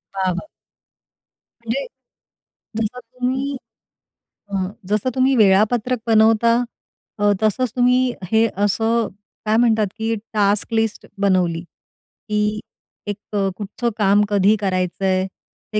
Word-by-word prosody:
वाह! 190 -1 +1
वाह! 180 - -6 1.1
म्हणजे 235 +4 -2 1.0
जसं 230 +3 -3
तुम्ही, 255 +3 -3 0.9
अ, 200 - -11 0.4
जसं 215 +5 +1
तुम्ही 265 +1 +3
वेळापत्रक 220 +3 +3
बनवता. 225 +1 +4 0.6
अ, 205 0 +4
तसंच 220 +3 +1
तुम्ही 250 0 +3 0.2
हे 225 +1 +4 0.2
असं 225 +3 +1 0.4
काय 215 +1 +2
म्हणतात, 225 -3 +3
की 225 0 -1 0.2
टास्क 205 +1 +1
लिस्ट 225 -1 0 0.2
बनवली, 180 -4 +2
की 210 +4 -5 0.5
एक 205 -1 -3 0.2
अ, 195 -1 +1
कुठचं 215 +4 -3
काम 205 -1 +4
कधी 205 +1 +4
करायचं 185 -1 -1
आहे? 185 0 +1 0.5
ते 210 - +2
215 Hz, 115 wpm, -20 LUFS, 200-235 Hz, 1.1 s, बनवता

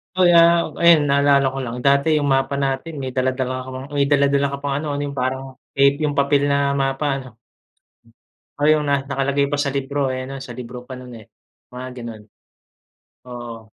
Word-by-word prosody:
Kaya 175 -2 +5 0.4
ayun 170 -2 +7
naalala 140 0 +4
ko 135 - -6
lang, 115 0 -5
dati 140 +3 +3
yung 145 -1 0
mapa 135 +1 0
natin 140 +3 -2
may 130 - -3
dala-dala 130 0 -1
ka - - -8
pang 130 +1 -6
may 140 - +3
dala-dala 140 -1 +3
ka - - -3
pang 140 -1 -2
ano, 155 +1 -4
ano 145 - -3
yung 140 -1 -7
parang 130 +1 -3 0.2
tape, 140 +2 +4
yung 145 -1 -2
papel 140 0 +3
na 140 0 +1
mapa 135 +2 -1
'no. 130 -3 -13 1.3
Oh, 145 - +1
yun 155 -1 +3
nga. 140 -1 +1
Nakalagay 140 +1 0
pa 145 - -1
sa 140 -1 -1
libro 140 -1 -1
eh, 130 0 -5
'no? 135 - -6
Sa 130 -2 -8
libro 125 0 -9
pa 130 - -9
no'n, 125 -1 -10
eh. 110 - -14 0.5
Mga 125 +1 -6
ganon. 115 -3 -8 1.1
Oo. 120 -2 -8
140 Hz, 190 wpm, -21 LUFS, 130-140 Hz, 1.3 s, ayun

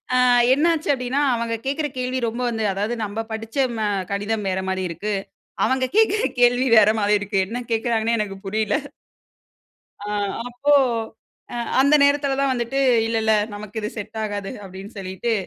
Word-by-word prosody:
அ - - +4 0.4
என்ன 290 +5 +3
ஆச்சு 320 -1 -3
அப்டின்னா, 260 +1 -1
அவுங்க 230 -1 -2
கேக்குற 290 +3 -1
கேள்வி 255 +1 -1
ரொம்ப 230 +2 -4
வந்து 225 -2 -2
அதாவது 205 +5 -2
நம்ப 210 +2 -4
படிச்ச 225 +2 -7 0.2
ம - - -5 0.3
கடிதம் 205 +1 -2
வேற 190 0 -1
மாரி 190 0 -1
இருக்கு. 200 +5 -3 0.5
அவங்க 260 0 +1
கேக்குற 435 -1 +4 0.2
கேள்வி 245 +1 +4
வேற 215 -1 +7
மாரி 205 0 +3
இருக்கு. 205 0 -3
என்ன 240 +4 -4
கேக்குறாங்கன்னே 230 0 +1
எனக்கு 195 -2 -3
புரில. 215 +1 0 1.3
அ, - - -8 0.4
அப்போ, 280 +4 +2 0.8
அ - - -3 0.2
அந்த 280 +2 +5
நேரத்தில 280 -1 +2
தான் 275 -1 +2
வந்துட்டு, 240 +2 -2 0.3
"இல்ல 225 0 -1
இல்ல, 220 0 +3 0.2
நமக்கு 210 +1 -7
இது 210 - -3
செட் 215 +2 -6
ஆகாது."அப்டின்னு 200 0 -7
சொல்லிட்டு 190 +4 -3
225 Hz, 160 wpm, -22 LUFS, 205-255 Hz, 1.3 s, வேற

